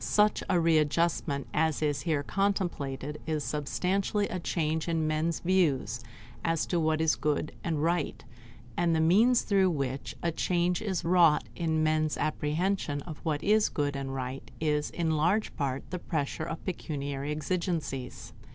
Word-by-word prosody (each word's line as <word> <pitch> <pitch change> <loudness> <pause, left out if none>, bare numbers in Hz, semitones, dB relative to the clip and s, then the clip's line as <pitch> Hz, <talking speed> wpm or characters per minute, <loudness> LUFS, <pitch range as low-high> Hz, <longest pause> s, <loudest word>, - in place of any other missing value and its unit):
Such 210 0 +3
a 180 - +3
readjustment 160 -2 +2
as 160 0 +1
is 145 -2 0
here 155 -4 0
contemplated 150 -7 -2
is 155 -2 -1
substantially 190 +7 0
a 185 - -3
change 160 -1 -1
in 165 -2 0
men's 155 +2 0
views 145 - +1 0.4
as 165 -1 +1
to 175 - 0
what 160 -1 +1
is 160 -1 +3
good 150 0 -1
and 155 -3 -1
right, 170 +2 0 0.5
and 170 -1 +2
the - - +2
means 215 +10 +5
through 195 -2 +3
which 140 -4 -3
a 170 - +1
change 175 +1 0
is 190 -6 -2
wrought 170 -3 +5
in 160 -2 0
men's 155 -1 +1
apprehension 155 0 -1
of 155 -3 -8
what 155 -3 -2
is 210 +1 +4
good 145 -1 -1
and 135 -1 -4
right 130 +1 -5
is 150 -1 0
in 165 -2 -1
large 185 +8 +1
part 135 -1 -2
the 180 - -3
pressure 155 -2 -2
of 165 0 -6
pecuniary 145 -6 -3
exigencies. 155 -4 -3
160 Hz, 155 wpm, -29 LUFS, 150-175 Hz, 0.5 s, means